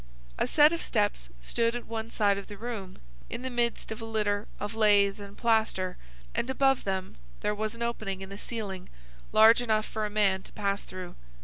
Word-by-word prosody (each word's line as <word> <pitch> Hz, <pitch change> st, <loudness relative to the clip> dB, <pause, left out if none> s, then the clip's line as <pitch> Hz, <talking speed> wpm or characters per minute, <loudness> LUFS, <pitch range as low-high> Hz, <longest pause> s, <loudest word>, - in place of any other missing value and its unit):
A -, -, +2 dB
set 300 Hz, +1 st, +6 dB
of 335 Hz, -, -2 dB
steps 205 Hz, -, 0 dB
stood 230 Hz, -, +1 dB
at 240 Hz, -, -5 dB
one 225 Hz, 0 st, -4 dB
side 205 Hz, -3 st, +2 dB
of 200 Hz, -, -10 dB
the 205 Hz, -, -9 dB
room, 215 Hz, -4 st, -6 dB, 0.3 s
in 245 Hz, -, -5 dB
the 260 Hz, -, -3 dB
midst 235 Hz, -2 st, -1 dB
of 220 Hz, -, -5 dB
a -, -, -4 dB
litter 210 Hz, -2 st, 0 dB
of 205 Hz, +2 st, -4 dB
lath 205 Hz, -2 st, +4 dB
and 200 Hz, 0 st, -10 dB
plaster, 220 Hz, -5 st, +1 dB, 0.4 s
and 250 Hz, -, -1 dB
above 270 Hz, 0 st, +2 dB
them 190 Hz, -1 st, -3 dB, 0.2 s
there 210 Hz, -, +1 dB
was 215 Hz, +1 st, -3 dB
an 235 Hz, -, -4 dB
opening 215 Hz, -5 st, -3 dB
in 190 Hz, -, -7 dB
the 200 Hz, +1 st, -8 dB
ceiling 205 Hz, -6 st, -5 dB, 0.4 s
large 225 Hz, +2 st, +7 dB
enough 215 Hz, -3 st, +1 dB
for 215 Hz, -, -3 dB
a -, -, -7 dB
man 200 Hz, -3 st, +2 dB
to -, -, -15 dB
pass 200 Hz, -1 st, -1 dB
through. 185 Hz, -1 st, -8 dB
215 Hz, 205 wpm, -29 LUFS, 200-230 Hz, 0.4 s, large